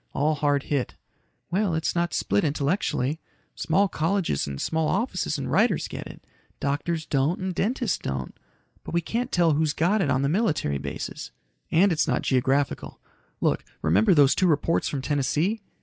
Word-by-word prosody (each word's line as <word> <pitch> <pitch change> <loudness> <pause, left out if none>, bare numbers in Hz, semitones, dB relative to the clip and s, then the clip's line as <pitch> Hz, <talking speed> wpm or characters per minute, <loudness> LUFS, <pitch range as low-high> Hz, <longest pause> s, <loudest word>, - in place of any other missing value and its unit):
All 150 +3 +1
hard 145 -1 +1
hit." 140 -4 -2 0.6
"Well, 190 -2 +1
it's 160 - -1
not 175 0 0
split 100 - +1
intellectually. 150 -1 0 0.3
Small 195 +6 +2
colleges 165 - 0
and 70 -1 -5
small 160 -1 0
offices 240 - -1
and - - -4
writers - - +2
get - - -7
it. - - -13 0.3
Doctors 155 +3 -1
don't 140 +5 0
and 185 0 -3
dentists 225 +3 0
don't. 65 -1 -4 0.5
But - - -6
we 170 - +3
can't 235 +8 -3
tell 170 -2 +3
who's 150 0 +1
got 195 +8 +2
it 155 - 0
on 130 0 +1
the - - +2
military 155 - 0
bases." - - -6 0.4
"And 185 +4 +4
it's 160 - +1
not - - 0
geographical. 135 +2 0 0.4
Look, - - +1 0.2
remember 95 - +4
those 145 -2 +6
two 185 - +2
reports 165 +1 +1
from 135 -3 -3
Tennessee? 150 - 0
155 Hz, 165 wpm, -25 LUFS, 140-180 Hz, 0.6 s, those